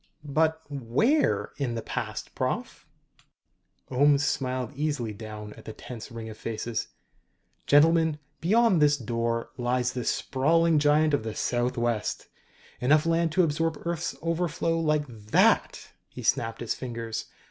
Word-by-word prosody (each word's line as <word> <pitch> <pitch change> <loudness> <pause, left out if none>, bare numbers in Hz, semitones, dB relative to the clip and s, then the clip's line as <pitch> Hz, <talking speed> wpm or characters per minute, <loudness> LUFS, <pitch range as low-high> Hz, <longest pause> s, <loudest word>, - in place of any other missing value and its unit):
"But, 160 +2 +1
where 145 - +1
in 130 -5 -2
the 115 - -4
past, - - -5
Prof.?" - - -3 1.0
Ohms 140 +2 +4
smiled 130 -2 -1
easily 145 -7 -2
down 105 0 -8
at - - -15
the 110 - -7
tense 115 -1 -9
ring 115 -1 -7
of 110 -1 -9
faces. 115 0 -3 0.8
"Gentlemen, 160 +1 +5 0.2
beyond 205 -1 +3
this 145 0 +5
door 115 -1 -2
lies 125 +1 0
the 125 -2 -3
sprawling 160 +7 +2
giant 150 +1 +3
of 145 - +2
the 110 -1 -5
Southwest 120 -2 -1 0.5
enough 150 +5 +3
land 165 0 +2
to 185 - +4
absorb 160 0 0
Earth's 170 -1 -2
overflow 165 0 0
like 150 -2 +1
that!" 110 -3 +1 0.2
He - - -9
snapped 115 0 0
his 120 - -1
fingers. 115 -3 -5
140 Hz, 135 wpm, -27 LUFS, 115-160 Hz, 1.0 s, Gentlemen